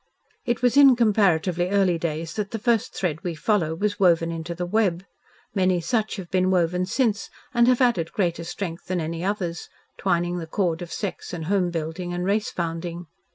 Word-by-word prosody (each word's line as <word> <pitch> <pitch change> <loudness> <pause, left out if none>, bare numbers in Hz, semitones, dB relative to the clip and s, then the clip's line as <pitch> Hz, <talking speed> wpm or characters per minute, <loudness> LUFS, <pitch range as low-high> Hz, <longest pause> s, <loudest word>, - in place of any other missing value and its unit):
It 240 -1 -1
was 250 +2 +3
in 275 -3 +8
comparatively 185 -6 +2
early 190 -4 +2
days 160 -1 -3
that 210 -2 -3
the 225 - -3
first 230 0 0
thread 165 -2 -2
we 175 -3 -3
follow 160 -1 +1
was 205 +3 -1
woven 170 -3 +3
into 165 +1 -5
the 180 +1 -3
web. 185 -2 +1 0.5
Many 185 -3 +2
such 215 +6 -1
have 185 -4 -8
been 185 0 +2
woven 180 0 +1
since 210 -2 0 0.2
and 235 -1 +4
have 255 0 +3
added 195 -10 +2
greater 170 -4 -1
strength 170 0 -5
than 185 -1 -1
any 165 +1 -3
others, 185 -4 -3 0.3
twining 175 -1 0
the 165 - -6
cord 170 -1 -1
of 175 - -7
sex 200 -3 -5
and 165 -3 -4
home 185 0 +1
building 170 +2 -4
and 180 0 -2
race 205 +2 +1
founding. 170 0 -4
180 Hz, 190 wpm, -24 LUFS, 170-205 Hz, 0.5 s, in